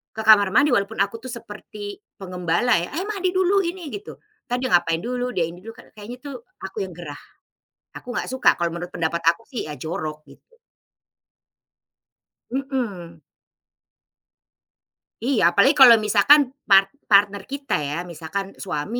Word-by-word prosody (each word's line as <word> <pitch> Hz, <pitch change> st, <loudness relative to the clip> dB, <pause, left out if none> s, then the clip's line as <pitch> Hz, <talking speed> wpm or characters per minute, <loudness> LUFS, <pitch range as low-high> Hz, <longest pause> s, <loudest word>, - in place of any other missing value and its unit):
ke 220 Hz, -, -4 dB
kamar 205 Hz, -3 st, +6 dB
mandi, 290 Hz, -1 st, +4 dB
walaupun 200 Hz, -1 st, 0 dB
aku 215 Hz, +3 st, -6 dB
tuh 255 Hz, -, -7 dB
seperti 210 Hz, -3 st, -9 dB, 0.2 s
penggembala 180 Hz, +2 st, 0 dB
ya, 170 Hz, -, -5 dB
eh 360 Hz, -, -2 dB
mandi 380 Hz, -4 st, -1 dB
dulu 375 Hz, +2 st, +3 dB
ini, 345 Hz, -1 st, -5 dB
gitu. 410 Hz, +2 st, -9 dB, 0.3 s
Entar 245 Hz, -, -1 dB
dia 255 Hz, 0 st, -3 dB
ngapain 170 Hz, -2 st, +2 dB
dulu, 250 Hz, +1 st, -3 dB
dia 175 Hz, -, +1 dB
ini 170 Hz, +2 st, -10 dB
dulu 225 Hz, +1 st, -10 dB, 0.2 s
kayaknya 220 Hz, +4 st, -9 dB
tuh 280 Hz, -2 st, -7 dB, 0.3 s
aku 190 Hz, 0 st, -4 dB
yang -, -, -11 dB
gerah, 160 Hz, -4 st, -9 dB, 0.8 s
aku 245 Hz, -1 st, -8 dB
nggak -, -, -2 dB
suka, 260 Hz, 0 st, +3 dB
kalau 170 Hz, -1 st, 0 dB
menurut 175 Hz, +1 st, -6 dB
pendapat 165 Hz, 0 st, -1 dB
aku 170 Hz, +7 st, +3 dB
sih 240 Hz, -, -5 dB
ya 150 Hz, -, -6 dB
jorok, 155 Hz, +1 st, -5 dB
gitu. 475 Hz, -, -20 dB, 1.9 s
Mhm. 235 Hz, -, -4 dB, 2.0 s
Iya, 245 Hz, 0 st, +1 dB
apalagi 265 Hz, -, +4 dB
kalau 245 Hz, -3 st, +10 dB
misalkan 215 Hz, +8 st, +5 dB, 0.3 s
part 195 Hz, 0 st, +6 dB, 0.2 s
partner 200 Hz, -1 st, +4 dB
kita 275 Hz, -5 st, -4 dB
ya, 145 Hz, 0 st, -3 dB, 0.2 s
misalkan 190 Hz, +4 st, -6 dB
suami 190 Hz, +6 st, -3 dB
205 Hz, 150 wpm, -22 LUFS, 175-255 Hz, 2.0 s, kalau